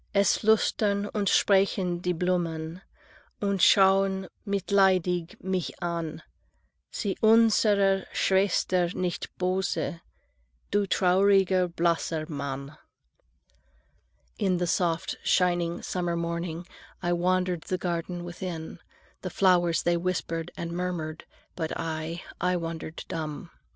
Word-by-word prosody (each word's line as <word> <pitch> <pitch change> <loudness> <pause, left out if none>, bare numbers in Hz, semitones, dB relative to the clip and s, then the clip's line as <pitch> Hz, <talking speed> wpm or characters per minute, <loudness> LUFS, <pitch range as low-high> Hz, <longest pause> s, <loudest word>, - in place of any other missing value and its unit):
"Es 200 0 +4
flüstern 205 -1 +2
und 205 -3 +1
sprechen 190 -3 +2
die 180 0 -1
Blumen 170 -1 -2 0.6
Und 200 -1 0
schau'n 190 0 +4 0.2
mitleidig 190 -3 +2
mich 185 -2 -1
an: 170 -2 -3 0.7
'Sei 200 -3 -2
unserer 210 -3 +4
Schwester 185 -2 +2
nicht 180 -2 -2
böse, 185 -2 -1 0.7
Du 205 -1 +1
trauriger, 190 0 +3
blasser 170 -2 0
Mann!'" 140 -2 -5 1.6
(In 190 -3 +1
the 175 - 0
soft 170 -1 0
shining 175 -1 +1
summer 175 -2 -2
morning 170 0 -3 0.4
I 175 - +1
wandered 180 0 +1
the 185 - -1
garden 175 0 -3
within. 175 -2 -6 0.4
The - - -4
flowers 175 -4 +3
they 175 0 +2
whispered 170 -2 -2
and 170 0 -4
murmured, 170 -3 -4 0.3
But 160 -2 -3
I, 165 +1 -4 0.2
I 180 0 +2
wandered 165 -1 -6
dumb. 155 -3 -5
180 Hz, 105 wpm, -27 LUFS, 170-190 Hz, 1.6 s, Es